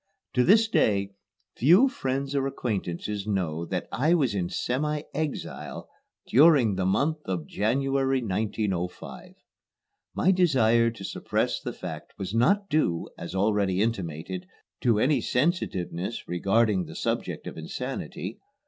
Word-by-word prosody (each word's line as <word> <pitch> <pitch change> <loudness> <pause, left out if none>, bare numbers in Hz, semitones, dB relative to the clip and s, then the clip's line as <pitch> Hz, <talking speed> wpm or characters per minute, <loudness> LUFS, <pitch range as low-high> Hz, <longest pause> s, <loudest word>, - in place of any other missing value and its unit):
To 125 - +3
this 220 - +5
day 100 - +2 0.4
few 180 - +6
friends 135 - -2
or 135 -1 +1
acquaintances 105 -4 -3
know 85 -5 -1
that 90 -2 -3
I 150 +11 +3
was 135 -10 +1
in 90 -3 -1
semi 150 +8 -1
exile 150 0 -4 0.4
during 135 -5 +5
the 95 -1 0
month 150 +11 +1
of 90 -5 -3
January, 135 - +1
1905. 100 -3 -3 0.8
My 190 - +3
desire 120 -11 +4
to 115 -4 -9
suppress - - -1
the - - -4
fact - - -8
was 95 0 -5
not 195 - +3
due, 145 - 0
as 85 +2 -7
already 100 -1 +1
intimated, 95 -5 -2 0.3
to 115 -3 +2
any 130 +3 +2
sensitiveness 115 - -1
regarding 100 +2 +2
the 80 0 -10
subject - - -2
of - - -6
insanity. - - -5
115 Hz, 130 wpm, -27 LUFS, 95-140 Hz, 0.8 s, few